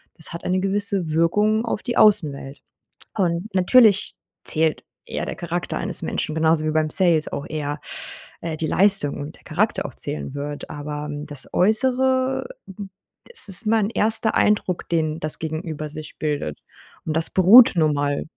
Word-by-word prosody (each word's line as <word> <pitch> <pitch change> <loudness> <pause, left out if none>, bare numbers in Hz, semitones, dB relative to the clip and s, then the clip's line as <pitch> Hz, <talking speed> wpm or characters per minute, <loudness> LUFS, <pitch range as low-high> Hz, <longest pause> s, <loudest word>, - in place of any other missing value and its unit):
das 160 - -7
hat 170 - -8
eine 185 +1 0
gewisse 195 -3 -1
Wirkung 210 +8 +1
auf 225 - -3
die 240 -2 -3
Außenwelt. 145 -9 +2 0.5
Und 175 -1 -1
natürlich 205 +2 +4 0.3
zählt 160 -1 0 0.2
eher - - -4
der - - -5
Charakter 175 +1 -4
eines 185 -1 -1
Menschen 155 - -3
genauso 160 0 +1
wie 155 - 0
beim 155 0 0
Sales 170 -4 +2
auch 140 - -5
eher, 145 -1 -4 0.6
äh, 160 -1 -5
die 160 - -3
Leistung 195 -6 +2
und 145 +3 -8
der - - -25
Charakter - - -1
auch - - -7
zählen 75 - -3
wird. 145 +1 -6
Aber 150 0 -6 0.2
das 145 -3 -2
äußere, 260 - +1 0.8
das 480 - -1
ist 195 +4 +6
mein 215 -2 +2
erster 220 0 +4
Eindruck, 205 -4 0
den 160 -2 -1
das 155 -1 -1
gegenüber 155 -1 -5
sich 155 0 -8
bildet. 145 - -3 0.5
Und 155 - -3
das 165 0 +4
beruht 210 +7 +7
nun 155 -3 +2
mal 145 0 -1
165 Hz, 160 wpm, -21 LUFS, 155-205 Hz, 0.8 s, beruht